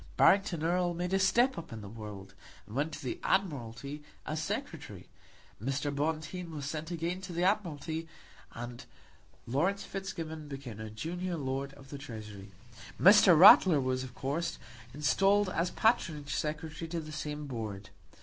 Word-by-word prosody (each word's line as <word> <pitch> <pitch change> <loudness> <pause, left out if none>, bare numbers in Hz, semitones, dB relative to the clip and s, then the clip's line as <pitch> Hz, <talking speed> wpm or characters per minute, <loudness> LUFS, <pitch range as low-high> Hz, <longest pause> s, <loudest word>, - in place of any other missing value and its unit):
Barrington 195 -5 +4
Erle 175 +1 +1
made 180 +2 -2
a 195 - +4
step 240 +6 +3
up 165 -4 -10
in 115 -1 -6
the 105 - -8
world, 100 -2 -9 0.3
and 105 - -10
went 145 +4 0
to - - -7
the 125 - -3
Admiralty 140 - -1 0.2
as 155 +1 -2
Secretary; - - -5 0.6
Mr. 135 +2 -1
Bonteen 160 +4 -2
was 150 -3 -5
sent 155 +2 -4
again 175 +2 -2
to 185 -1 -7
the 175 +1 -1
Admiralty; 165 -5 0 0.5
and 120 +1 -7 0.6
Laurence 170 +11 0
Fitzgibbon 165 -5 -5
became 135 -6 -7
a 110 0 -6
junior 170 +10 -4
Lord 135 -1 -3
of 135 0 -15
the 140 - -6
Treasury. 105 -7 -9 0.5
Mr. 190 -2 +8
Ratler 180 -2 +9
was, 130 -1 0
of 125 -1 -9
course, 160 +6 -2 0.3
installed 195 +9 +3
as 175 0 0
Patronage 155 - +1
Secretary 155 +2 -3
to 170 0 -2
the 155 -1 -8
same 150 0 -4
Board. 110 -6 -6
155 Hz, 155 wpm, -31 LUFS, 130-175 Hz, 0.6 s, Ratler